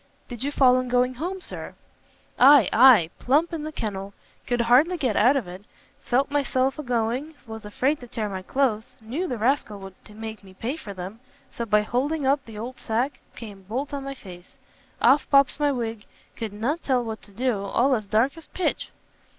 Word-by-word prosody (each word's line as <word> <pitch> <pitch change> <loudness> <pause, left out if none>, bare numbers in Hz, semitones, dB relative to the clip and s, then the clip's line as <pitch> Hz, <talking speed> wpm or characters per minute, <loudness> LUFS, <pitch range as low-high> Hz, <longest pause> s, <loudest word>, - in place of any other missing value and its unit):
"Did 240 -1 -5
you 285 - -1
fall 255 -3 +5
in 255 - -3
going 250 +1 +2
home, 355 +8 -5
Sir?" - - -7 0.6
"Ay, 270 -3 +8
ay, 225 -9 +7
plump 305 +7 +2
in 325 - -3
the 310 +1 -5
kennel; 200 -6 -5 0.3
could 245 -1 +1
hardly 265 +10 +4
get 255 -9 0
out 245 +7 +5
of 235 -9 -3
it; 180 +3 -9 0.4
felt 270 +3 0
myself 270 -1 0
a - - -1
going, 250 +4 -2
was 220 -2 -8
afraid 270 +8 0
to 245 - -11
tear 220 -2 -3
my 190 -2 -5
cloaths, 255 +1 -1
knew 260 +12 -4
the 250 - -3
rascal 225 -2 0
would 195 -1 -10 0.2
make 220 0 -8
me 190 -1 -15
pay 240 +8 -3
for 205 -11 -9
them, 185 +5 -7 0.3
so 235 - -5
by 210 0 +3
holding 275 +7 -1
up 275 0 +2
the 225 -2 -10
old 245 +4 -7
sack, 250 +4 -1 0.2
come 205 -4 -10
bolt 250 +10 -4
on 280 -1 -4
my 275 0 -6
face! 180 -7 -13 0.4
off 285 +2 +4
pops 280 0 +4
my 290 -1 +2
wig; 230 -5 -4 0.3
could 225 -3 -5
not 245 +11 -2
tell 255 -3 +1
what 220 -1 -6
to - - -14
do; 225 0 -1
all 245 +7 +2
as 215 -5 -1
dark 230 +8 +2
as 320 - -13
pitch!" 370 - -2
245 Hz, 200 wpm, -24 LUFS, 215-275 Hz, 0.6 s, Ay